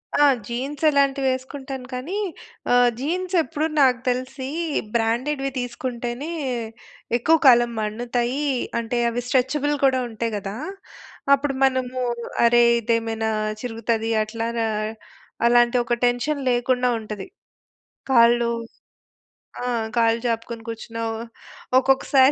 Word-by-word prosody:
ఆ! 290 - +5 0.2
జీన్స్ 270 +5 -4
అలాంటివి 275 -1 +2
వేసుకుంటాను. 260 0 -6
కానీ 300 +11 -4 0.6
ఆహ్, 245 0 +6
జీన్స్ 360 +6 -2
ఎప్పుడు 295 +5 -2
నాకు 255 -3 +4
తెలిసి 260 +1 -3 0.5
బ్రాండెడ్‌వి 260 +5 0
తీసుకుంటేనే 245 +3 -4 0.9
ఎక్కువ 320 +7 +4
కాలం 240 -1 +6
మన్నుతాయి. 240 +5 -1 0.3
అంటే, 235 +1 -2
అవి 240 +1 -2
స్ట్రెచ్‌బుల్ 280 +3 +1
కూడా 260 -1 +3
ఉంటాయి 225 0 -3
కదా! 195 +1 -5 0.8
అప్పుడు 275 0 -2
మనము 255 -1 -1 0.4
అరే! 240 0 +6 0.2
ఇదేమైనా 225 -1 -1 0.3
చిరుగుతది 230 -1 -2
అట్లారా, 230 +1 -2 0.8
అలాంటి 240 +1 +4
ఒక 240 - -1
టెన్షన్ 245 +4 0
లేకుండా 250 +1 +1
ఉంటది. 210 - -7 0.8
కాళ్ళు 235 -1 +5 1.1
ఆ! - - -2 0.3
కాళ్ళు 230 0 +3
చాపుకొని 230 0 -3
కూర్చున్నావు. 225 0 -4 0.6
ఒక్కొక్కసారి 265 +1 +4
245 Hz, 100 wpm, -23 LUFS, 230-270 Hz, 1.1 s, ఆహ్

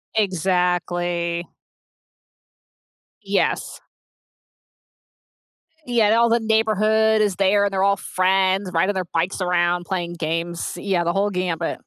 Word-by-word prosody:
Exactly. 175 -2 -1 1.8
Yes. - - -1 2.1
Y 245 - -5
yeah, 220 -1 +4
all 235 0 +4
the 235 - +3
neighborhood 220 0 +2
is 205 -3 +1
there 200 +1 +3
and 200 -1 -1
they're 190 0 +1
all 200 0 +3
friends 190 +1 +1
riding 190 +5 +1
their 185 -2 -3
bikes 170 +3 -2
around 175 0 0
playing 175 -3 -3
games, 165 +1 -3
yeah 185 -4 -1
the 170 +1 -1
whole 200 +1 +1
gambit. 180 -3 -2
185 Hz, 115 wpm, -21 LUFS, 175-205 Hz, 2.1 s, yeah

